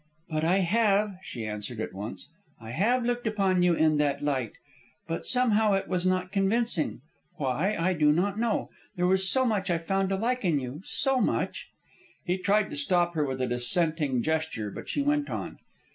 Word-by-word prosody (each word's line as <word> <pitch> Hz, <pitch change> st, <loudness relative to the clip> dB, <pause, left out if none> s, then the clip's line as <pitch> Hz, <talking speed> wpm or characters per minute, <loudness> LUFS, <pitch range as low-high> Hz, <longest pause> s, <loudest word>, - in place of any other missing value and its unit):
"But 155 Hz, 0 st, -1 dB
I 180 Hz, +4 st, +3 dB
have," 205 Hz, 0 st, +2 dB
she 115 Hz, -10 st, -6 dB
answered 105 Hz, +2 st, -5 dB
at 110 Hz, -, -4 dB
once. 105 Hz, +4 st, -7 dB, 0.3 s
"I 110 Hz, 0 st, -9 dB
have 235 Hz, -, +1 dB
looked 245 Hz, -1 st, -1 dB
upon 195 Hz, -4 st, +1 dB
you 175 Hz, -1 st, +4 dB
in 155 Hz, -1 st, +3 dB
that 145 Hz, -1 st, 0 dB
light, 130 Hz, -6 st, -1 dB, 0.5 s
but 165 Hz, 0 st, -3 dB
somehow 220 Hz, -4 st, +3 dB
it 195 Hz, -, 0 dB
was 185 Hz, -1 st, 0 dB
not 185 Hz, 0 st, 0 dB
convincing. 195 Hz, -, +1 dB, 0.3 s
Why, 150 Hz, +10 st, -1 dB
I 185 Hz, +3 st, +2 dB
do 150 Hz, -3 st, +4 dB
not 195 Hz, +6 st, 0 dB
know. 230 Hz, -2 st, -1 dB, 0.2 s
There 180 Hz, -1 st, 0 dB
was 190 Hz, +1 st, +3 dB
so 260 Hz, -1 st, +2 dB
much 205 Hz, -5 st, 0 dB
I 175 Hz, -, +2 dB
found 195 Hz, +3 st, -1 dB
to 195 Hz, -, +1 dB
like 245 Hz, +5 st, -1 dB
in 165 Hz, -6 st, +2 dB
you, 130 Hz, +4 st, -6 dB
so 270 Hz, -2 st, +1 dB
much -, -, -1 dB, 0.3 s
" 345 Hz, -2 st, -31 dB
He 180 Hz, 0 st, 0 dB
tried 205 Hz, +2 st, +2 dB
to -, -, -5 dB
stop 175 Hz, +4 st, +2 dB
her 155 Hz, -2 st, 0 dB
with 130 Hz, -2 st, -3 dB
a -, -, 0 dB
dissenting 135 Hz, +1 st, 0 dB
gesture, 155 Hz, -10 st, -2 dB
but -, -, -8 dB
she 285 Hz, -, 0 dB
went 295 Hz, 0 st, +1 dB
on. -, -, -5 dB
180 Hz, 195 wpm, -27 LUFS, 150-210 Hz, 0.5 s, you